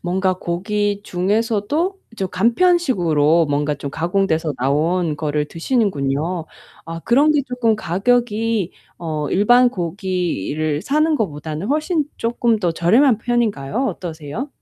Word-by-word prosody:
뭔가 185 +1 0
고기 205 +4 -1
중에서도 220 - -1 0.2
좀 190 -3 -2
간편식으로 180 - +3
뭔가 145 +1 0
좀 140 0 -6
가공돼서 165 -2 0
나온 155 +5 0
거를 150 -1 -1
드시는군요. 165 - -1 0.4
아 165 0 -6
그런 280 - +3
게 295 -2 +2
조금 245 -3 +1
가격이 215 +1 0 0.3
어 155 -3 -3
일반 245 +6 +5
고기를 170 - -2
사는 305 +6 +2
것보다는 155 - -3
훨씬 305 - 0
조금 230 -1 0
더 180 -4 0
저렴한 225 - +3
편인가요? 230 - -1
어떠세요? 165 - -6
190 Hz, 275 characters per minute, -20 LUFS, 160-235 Hz, 0.4 s, 일반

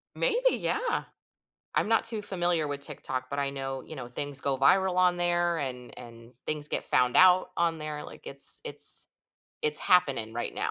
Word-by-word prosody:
Maybe, - - -1
yeah. 470 -2 -4 0.7
I'm - - -2
not 225 -1 0
too 225 -2 -3
familiar 175 -5 -1
with 145 -1 -7
TikTok, 130 -2 -6
but 140 - -7
I 140 -1 -3
know, 135 -1 -8
you 160 - -13
know, 125 -3 -10
things 140 +2 0
go 140 -1 -3
viral 185 +7 0
on 180 -1 0
there 175 -1 -2
and 125 -3 -8
and 115 0 -15
things 150 -1 0
get - - -4
found 125 -1 0
out 185 0 +3
on 170 -1 -2
there. 150 -1 -8
Like, - - -15
it's 140 0 +6
it's - - +6 0.5
it's 150 0 +9
happening 140 -12 -1
right 120 - -6
now. - - -3
150 Hz, 185 wpm, -25 LUFS, 135-180 Hz, 0.7 s, it's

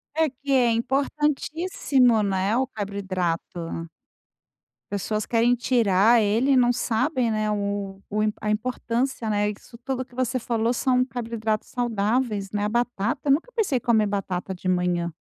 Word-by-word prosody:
É 320 -2 +2
que 275 +2 -7
é 245 -3 +4
importantíssimo, 275 0 +1
né, 195 +2 0
o 260 +1 +1
carboidrato. 180 -5 -4 1.0
Pessoas 210 +2 -1
querem 235 +2 +2
tirar 230 -2 +3
ele 225 +6 +2
e - - +4
não 245 -1 +4
sabem, 250 +2 0
né, 215 -1 0
o 200 -1 -3
o 210 +1 0 0.2
a 210 - -2
importância, 235 +2 -1
né, 205 0 +1
isso 230 +3 -13
tudo 260 +1 -3
que 250 -1 -20
você 255 0 0
falou 230 0 0
são 255 0 +2
carboidratos 230 -3 -3
saudáveis, 220 -3 -1
né, 205 -1 -1
a 210 - 0
batata, 240 +1 -1
eu 280 - +3
nunca 345 - -1
pensei 380 - +1
em - - -4
comer 220 -3 +3
batata 195 -2 -3
de 180 - -7
manhã. 180 -2 0
230 Hz, 155 wpm, -24 LUFS, 205-255 Hz, 1.0 s, é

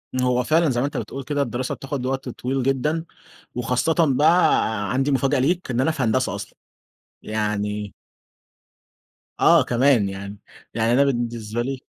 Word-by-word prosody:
هو 125 -1 +1
فعلًا 160 +4 +2
زي 120 -2 0
ما - - +1
أنت 145 - -4
بتقول 135 - -5
كده 145 +1 -1
الدراسة 125 0 -2
بتاخد 135 -2 -5
وقت 130 0 -2
طويل 130 +2 -3
جدًا، 150 +5 0 0.5
وخاصةً 125 +6 0
بقى 145 - +3
عندي 135 +3 +1
مفاجأة 135 +1 +1
ليك، 165 +5 0
إن 125 0 0
أنا 135 - +2
في 155 -4 -2
هندسة 120 -3 +1
أصلًا. 100 - -8 0.6
يعني 105 -1 -3 1.5
آه - - +6
كمان 120 -4 +2
يعني. 100 +1 -7 0.4
يعني 115 +1 +1
أنا 135 +3 +5
بالنسبة 120 -3 -2
لي 135 +2 -3
125 Hz, 150 wpm, -22 LUFS, 115-140 Hz, 1.5 s, آه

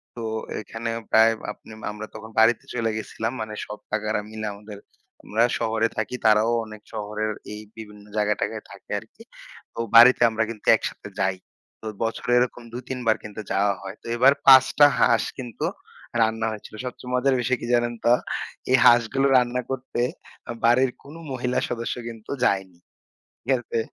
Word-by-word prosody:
তো 120 - -6 0.3
এইখানে 115 +1 -5 0.2
প্রায় 110 +1 +6 0.2
আপনি 110 0 -13
আমরা 105 +1 -7
তখন 110 +1 -9
বাড়িতে 115 +1 +4
চইলা 115 -2 0
গেছিলাম। 110 +1 -4
মানে 110 -1 -5
সব 105 - -8
কাকারা 110 0 -1
মিলা 110 0 -5
আমাদের, 105 0 -11 0.5
আমরা 110 +2 +1 0.2
শহরে 115 0 +1
থাকি। 110 +3 -2
তারাও 110 +1 +5
অনেক 110 -1 -11
শহরের 105 0 -3 0.2
এই 105 - -7 0.2
বিভিন্ন 105 -2 -11
জায়গাটাগায় 105 0 -1
থাকে - - -15
আরকি। - - -17 0.5
তো - - -9 0.2
বাড়িতে 120 +2 +9
আমরা 110 0 0
কিন্তু 110 -2 -8
একসাথে - - -5
যাই। 95 +2 +1 0.4
তো - - -12 0.2
বছরে 115 +2 -2
এরকম 125 0 -1
২-৩ 125 +1 -5
বার 110 - +4
কিন্তু 105 0 -7
যাওয়া 100 +1 +2
হয়। 95 0 -7
তো - - -24
এবার 130 +4 +6
৫ 130 -1 +10
টা 145 - +10
হাঁস 115 -2 +4
কিন্তু 120 -4 -5 0.6
রান্না 110 0 +1
হয়েছিল। 110 0 -9
সবচেয়ে 125 0 -7
মজার 130 +1 +2
বিষয় 130 +1 +1
কি - - -5
জানেন 120 0 +2
তো? 120 - +6 0.6
এই 130 - +7
হাঁসগুলো 120 +4 +5
রান্না 125 0 +1
করতে 130 -2 -3 0.6
বাড়ির 125 +2 +4
কোন 145 +3 -12 0.2
মহিলা 125 -1 -1
সদস্য 115 -1 -3
কিন্তু 115 -2 -9
যায়নি। 95 -4 0 0.6
ঠিক - - -13
আছে? 115 -1 -3
115 Hz, 165 wpm, -24 LUFS, 110-120 Hz, 0.6 s, ৫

